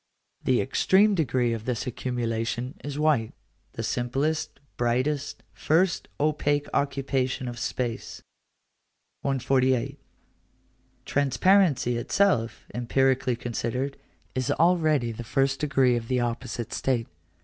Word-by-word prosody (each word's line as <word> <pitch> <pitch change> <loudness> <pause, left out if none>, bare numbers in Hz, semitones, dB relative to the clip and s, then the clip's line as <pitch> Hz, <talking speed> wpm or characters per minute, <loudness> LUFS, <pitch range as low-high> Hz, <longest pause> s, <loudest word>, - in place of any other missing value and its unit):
The 130 -2 +3
extreme 195 +9 +3
degree 130 -8 +1
of 115 -1 -5
this 125 -1 -2
accumulation 120 0 -2
is 145 0 -5
white; 150 -8 +1 0.4
the - - -4
simplest, 135 +6 -1 0.2
brightest, 130 +4 -1
first, 170 +3 +1
opaque 145 -1 +1
occupation 135 -2 0
of 120 -1 -6
space. 120 -3 -4 1.0
148. 130 -2 +1 1.1
Transparency 145 -2 +3
itself, 120 - +1
empirically 130 +1 +1
considered, 120 +3 -3 0.4
is 130 -1 -2
already 155 -8 +3
the 115 +1 -7
first 135 +2 +1
degree 135 -4 +3
of 115 -1 -3
the 130 0 +1
opposite 120 0 -3
state. 120 -4 0
130 Hz, 105 wpm, -26 LUFS, 120-145 Hz, 1.1 s, The